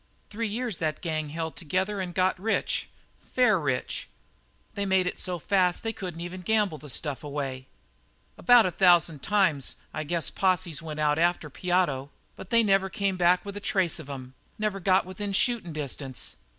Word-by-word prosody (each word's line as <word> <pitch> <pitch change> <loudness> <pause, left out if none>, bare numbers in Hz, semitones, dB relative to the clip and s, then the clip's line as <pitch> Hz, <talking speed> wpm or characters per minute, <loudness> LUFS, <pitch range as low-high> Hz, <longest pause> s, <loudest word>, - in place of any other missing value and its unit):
"Three 225 +2 -2
years 225 -2 -3
that 155 -1 -1
gang 155 -3 -2
held 160 +1 -4
together 190 +5 -1
and 180 -1 -4
got 185 0 +2
rich 220 +4 -1 0.3
fair 230 -7 +2
rich. 135 -5 -2 0.7
They 200 - -2
made 190 -2 +3
it 180 - -3
so 180 -2 -1
fast 180 +1 +1
they 225 0 -1
couldn't 180 -5 -6
even 180 +2 -6
gamble 205 -4 +1
the 150 - -11
stuff 140 0 -3
away. 135 -3 -4 0.7
About 245 +3 +6
a 185 - 0
thousand 170 -4 +4
times, 185 -9 +1 0.2
I 155 - -3
guess 165 +2 -1
posses 185 -5 +1
went 155 -2 -6
out 150 0 +2
after 170 -3 +1
Piotto, 175 -6 0 0.3
but 190 - -10
they 230 -1 +5
never 195 -2 +3
came 195 0 -1
back 180 +1 +3
with 200 0 -6
a - - -4
trace 190 -5 0
of 150 -3 -10
'em; 130 -2 -7 0.2
they 215 - -6
never 205 -2 0
got 185 0 +3
within 195 +2 -5
shootin' 220 -4 +1
distance. 140 -3 -4
180 Hz, 180 wpm, -27 LUFS, 155-195 Hz, 0.7 s, About